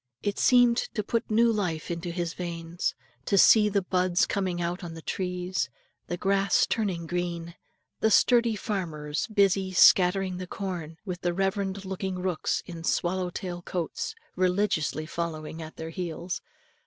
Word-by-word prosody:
It 205 Hz, -1 st, -1 dB
seemed 245 Hz, -2 st, +5 dB, 0.2 s
to 210 Hz, -, 0 dB
put 230 Hz, +3 st, -1 dB
new 230 Hz, +2 st, +4 dB
life 175 Hz, -7 st, -2 dB
into 170 Hz, +1 st, -4 dB
his 170 Hz, -1 st, -2 dB
veins, 170 Hz, -1 st, -3 dB, 0.3 s
to 200 Hz, -, +2 dB
see 210 Hz, +2 st, +7 dB
the 200 Hz, -1 st, +1 dB
buds 180 Hz, -1 st, +2 dB
coming 185 Hz, -3 st, -1 dB
out 175 Hz, +2 st, -2 dB
on 165 Hz, -2 st, -6 dB
the 165 Hz, -, -8 dB
trees, 180 Hz, -5 st, -2 dB, 0.4 s
the 175 Hz, -, -3 dB
grass 195 Hz, +2 st, +3 dB
turning 190 Hz, -7 st, -1 dB
green, 175 Hz, 0 st, -2 dB
and 170 Hz, +1 st, -12 dB, 0.4 s
the 220 Hz, -, +3 dB
sturdy 235 Hz, +1 st, +4 dB
farmers 160 Hz, -8 st, -3 dB
busy 195 Hz, -3 st, +2 dB
scattering 185 Hz, +1 st, +5 dB
the 185 Hz, 0 st, -6 dB
corn, 175 Hz, -5 st, -5 dB
with 180 Hz, -2 st, -5 dB
the 175 Hz, -1 st, 0 dB
reverend 195 Hz, 0 st, -1 dB
looking 190 Hz, 0 st, -3 dB
rooks 180 Hz, -3 st, -1 dB
in 170 Hz, -2 st, -8 dB
swallowtail 180 Hz, +1 st, -1 dB
coats, 175 Hz, -, -3 dB, 0.2 s
religiously 180 Hz, -4 st, +1 dB
following 160 Hz, -1 st, -4 dB
at 160 Hz, 0 st, -9 dB
their 160 Hz, 0 st, -6 dB
heels. 175 Hz, +1 st, -4 dB
180 Hz, 155 wpm, -27 LUFS, 170-195 Hz, 0.4 s, see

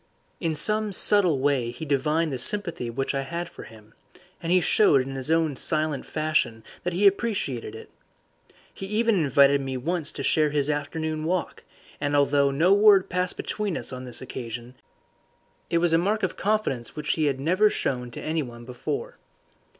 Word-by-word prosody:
In 165 Hz, -3 st, -1 dB
some 215 Hz, +6 st, +1 dB
subtle 190 Hz, -5 st, +5 dB
way 135 Hz, -3 st, +1 dB
he 140 Hz, +7 st, -7 dB
divined 150 Hz, +2 st, 0 dB
the 130 Hz, -, -3 dB
sympathy 170 Hz, -, -1 dB
which 135 Hz, +5 st, -2 dB
I 135 Hz, -, -1 dB
had 170 Hz, +5 st, -4 dB
for -, -, -11 dB
him, 110 Hz, -1 st, -16 dB, 0.5 s
and 170 Hz, -, -3 dB
he 185 Hz, -, +5 dB
showed 175 Hz, -5 st, +4 dB
in 135 Hz, +1 st, -7 dB
his 135 Hz, +2 st, -5 dB
own 160 Hz, -3 st, +2 dB
silent 155 Hz, 0 st, -1 dB
fashion 150 Hz, -8 st, -1 dB, 0.2 s
that 180 Hz, -, -2 dB
he 190 Hz, +4 st, +1 dB
appreciated 190 Hz, -, 0 dB
it. 110 Hz, -, -11 dB, 0.8 s
He 195 Hz, -, -7 dB
even 225 Hz, +3 st, +1 dB
invited 140 Hz, -5 st, +4 dB
me 135 Hz, -1 st, -4 dB
once 165 Hz, +4 st, -3 dB
to 140 Hz, -, -5 dB
share 150 Hz, +2 st, +2 dB
his 145 Hz, 0 st, +1 dB
afternoon 155 Hz, +2 st, -3 dB
walk, 180 Hz, +1 st, -2 dB, 0.4 s
and 145 Hz, 0 st, -1 dB
although 140 Hz, 0 st, +3 dB
no 160 Hz, +8 st, +3 dB
word 205 Hz, -2 st, +5 dB
passed 180 Hz, 0 st, -1 dB
between 205 Hz, -5 st, -3 dB
us -, -, -5 dB
on 130 Hz, 0 st, -7 dB
this 125 Hz, 0 st, -5 dB
occasion, 120 Hz, -1 st, -7 dB, 1.0 s
it 170 Hz, -, +1 dB
was 170 Hz, -1 st, +2 dB
a 165 Hz, -, +5 dB
mark 205 Hz, +4 st, 0 dB
of 185 Hz, -, -1 dB
confidence 205 Hz, -, -1 dB
which 150 Hz, -1 st, -1 dB
he 155 Hz, -, 0 dB
had 135 Hz, -2 st, 0 dB
never 185 Hz, +9 st, +3 dB
shown 125 Hz, -9 st, -2 dB
to 120 Hz, -, -9 dB
anyone 125 Hz, -7 st, -4 dB
before. 430 Hz, -, -5 dB
155 Hz, 180 wpm, -25 LUFS, 135-180 Hz, 1.0 s, subtle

